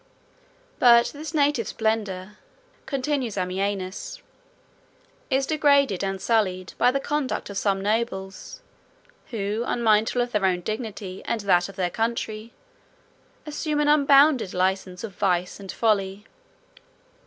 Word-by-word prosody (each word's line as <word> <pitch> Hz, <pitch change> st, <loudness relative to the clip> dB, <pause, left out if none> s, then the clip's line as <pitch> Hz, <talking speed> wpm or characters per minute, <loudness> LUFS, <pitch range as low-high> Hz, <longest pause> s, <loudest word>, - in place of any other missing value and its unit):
But 235 Hz, -1 st, +6 dB
this 300 Hz, +1 st, -7 dB
native 290 Hz, -6 st, +1 dB
splendor," 210 Hz, -3 st, -2 dB, 0.5 s
continues 270 Hz, -5 st, -2 dB
Ammianus, 190 Hz, -, -3 dB, 1.1 s
"is 270 Hz, 0 st, +2 dB
degraded, 280 Hz, -, +3 dB
and 195 Hz, 0 st, -2 dB
sullied, 185 Hz, -5 st, 0 dB
by -, -, +5 dB
the 275 Hz, +2 st, 0 dB
conduct 280 Hz, -6 st, -2 dB
of 200 Hz, -, -6 dB
some 195 Hz, -2 st, 0 dB
nobles, 210 Hz, -, -3 dB, 0.7 s
who, 215 Hz, -1 st, -2 dB
unmindful 225 Hz, 0 st, +2 dB
of 240 Hz, -, -6 dB
their 210 Hz, -2 st, 0 dB
own 180 Hz, -1 st, 0 dB
dignity, 210 Hz, -2 st, -5 dB
and 230 Hz, -, -1 dB
of -, -, -14 dB
that 175 Hz, -1 st, +3 dB
of 195 Hz, -, -11 dB
their 180 Hz, -2 st, -1 dB
country, 225 Hz, -1 st, -3 dB, 0.9 s
assume 300 Hz, 0 st, -2 dB
an 295 Hz, -, +2 dB
unbounded 280 Hz, -7 st, +5 dB
license 185 Hz, 0 st, -1 dB
of 215 Hz, -4 st, -6 dB
vice 180 Hz, -2 st, 0 dB
and 195 Hz, -1 st, -7 dB
folly. 200 Hz, -2 st, 0 dB
215 Hz, 125 wpm, -24 LUFS, 195-260 Hz, 1.1 s, But